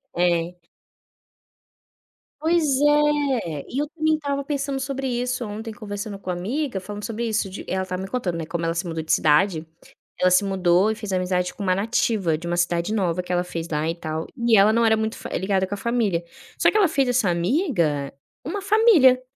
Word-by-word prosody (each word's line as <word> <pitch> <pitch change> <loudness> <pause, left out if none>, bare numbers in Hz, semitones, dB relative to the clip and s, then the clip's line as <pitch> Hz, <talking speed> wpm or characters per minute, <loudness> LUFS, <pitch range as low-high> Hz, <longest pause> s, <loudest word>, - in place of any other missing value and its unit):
É. 175 -1 +1 1.9
Pois 330 +2 +2 0.2
é, 290 - +2
e 260 - -3
eu 295 - -2
também 315 0 0
estava 280 -2 -3
pensando 275 -1 -2
sobre 270 0 -3
isso 250 0 -2
ontem, 220 +1 -6
conversando 205 -1 -6
com 185 - -8
uma 180 - -1
amiga, 245 - -2
falando 205 +2 -8
sobre 230 +1 -3
isso 215 -3 -1
de 185 - -8
ela 190 0 -1
estava 185 0 -4
me 190 - -5
contando, 185 -10 -2
né, 165 - -4
como 170 +1 -3
ela 165 - 0
se 170 +2 -3
mudou 165 -1 -3
de 160 - -4
cidade, 155 +2 +3 0.5
ela 185 0 +3
se 180 +3 +5
mudou 190 0 +2
e 220 - -1
fez 210 -3 -6
amizade 180 -1 0
com 205 - -7
uma 185 -1 +2
nativa, 200 -5 0
de 170 +2 -7
uma 175 - -1
cidade 175 +2 0
nova 180 -4 0
que 180 - -4
ela 175 0 +1
fez 170 -2 -5
lá, 155 +1 -1
e 165 - -2
tal. 160 -1 -4
E 235 -2 +4
ela 200 +2 +6
não 230 +1 +3
era 220 - +4
muito 220 0 -2
fã - - -7
eh, - - -1
ligada 190 -1 0
com 200 - -5
a - - -3
família. 210 -6 0 0.3
Só - - +4
que - - +1
ela 400 -4 +5
fez 275 -4 +1
essa 245 -6 +2
amiga, 170 - 0 0.3
uma 390 +7 -3
família. 390 - +5
205 Hz, 210 wpm, -23 LUFS, 175-255 Hz, 1.9 s, ela